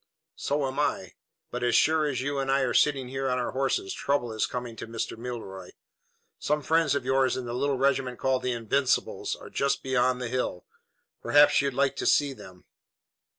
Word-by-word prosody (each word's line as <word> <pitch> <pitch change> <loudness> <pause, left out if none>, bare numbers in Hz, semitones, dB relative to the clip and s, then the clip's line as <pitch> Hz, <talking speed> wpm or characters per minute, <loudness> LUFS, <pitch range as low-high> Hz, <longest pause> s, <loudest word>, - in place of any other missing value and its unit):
"So 145 0 -1
am 135 0 -3
I; - - -1 0.4
but 125 - -4
as 120 -1 +2
sure 155 -1 +3
as 130 -3 -2
you 140 +1 -2
and 135 0 -1
I 135 +1 +3
are 130 -2 0
sitting 135 -4 +2
here 135 0 -2
on 125 - 0
our 125 - -2
horses, 370 - -1
trouble 120 -5 -1
is 110 - 0
coming 120 -2 -5
to - - -7
Mr. 115 0 -4
Milroy. 110 -6 -7 0.7
Some 150 0 -1
friends 160 0 +2
of 140 - -2
yours 130 0 +2
in 130 - -4
the 120 - -5
little 135 +2 0
regiment 135 -2 +1
called 130 -1 0
the 125 - -1
Invincibles 125 +3 0
are - - -12
just 140 0 0
beyond 130 -1 +1
the 125 - -3
hill. 120 -7 -3 0.6
Perhaps 145 0 +5
you'd 140 -2 -2
like 140 0 +1
to - - -1
see 145 -2 +3
them." 90 -7 -14
130 Hz, 195 wpm, -27 LUFS, 125-140 Hz, 0.7 s, Perhaps